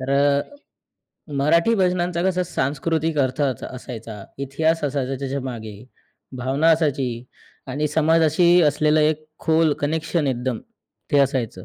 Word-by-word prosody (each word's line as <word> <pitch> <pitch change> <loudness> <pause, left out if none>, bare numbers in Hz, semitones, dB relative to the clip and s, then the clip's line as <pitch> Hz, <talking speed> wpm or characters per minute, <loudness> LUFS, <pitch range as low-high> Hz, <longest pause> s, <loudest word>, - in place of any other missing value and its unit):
तर 130 +1 -4
अ, 140 0 +3 1.0
मराठी 170 +9 +3
भजनांचा 180 -3 0
कसा 185 -1 +1
सांस्कृतिक 160 0 -1
अर्थ 130 0 0
च 130 -4 -1
असायचा, 115 -5 -8 0.2
इतिहास 160 +4 0
असायचा 135 -1 -2
त्याच्यामागे, 130 -5 -5 0.6
भावना 135 +6 +1
असायची 145 -5 +1 0.6
आणि 150 +3 -1
समाजाशी 160 +2 +3
असलेलं 150 +1 +3
एक 155 0 +1 0.2
खोल 160 -1 +3
कनेक्शन 155 +1 -1
एकदम 125 -2 -2 0.5
ते 145 - +5
असायचं 125 -8 -2
145 Hz, 120 wpm, -22 LUFS, 130-160 Hz, 1.0 s, ते